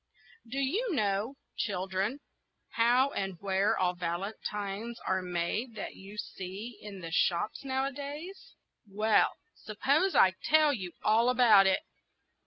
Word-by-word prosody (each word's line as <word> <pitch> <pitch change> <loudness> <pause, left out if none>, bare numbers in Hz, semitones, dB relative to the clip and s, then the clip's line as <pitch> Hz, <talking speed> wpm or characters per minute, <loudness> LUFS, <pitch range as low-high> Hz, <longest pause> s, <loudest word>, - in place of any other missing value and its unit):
DO 265 - -5
you 355 - 0
know, 210 +3 0 0.2
children, 195 +5 -2 0.5
how 245 +4 +3
and 195 -6 -3
where 195 +1 +1
all 180 -1 +1
the 180 - -20
valentines 200 +5 -4
are 190 0 +1
made 180 +7 -2
that 210 - -6
you 200 +2 -12
see 200 +4 -6
in 200 -3 -9
the 165 -1 -6
shops 175 +8 0
nowadays? 280 +7 -4 0.3
Well, 215 +2 +3 0.2
suppose 285 - 0
I 185 - +6
tell 310 -1 +4
you 185 -8 -5
all 225 +3 +4
about 230 -6 +6
it. 190 - +2
210 Hz, 130 wpm, -30 LUFS, 190-265 Hz, 0.5 s, I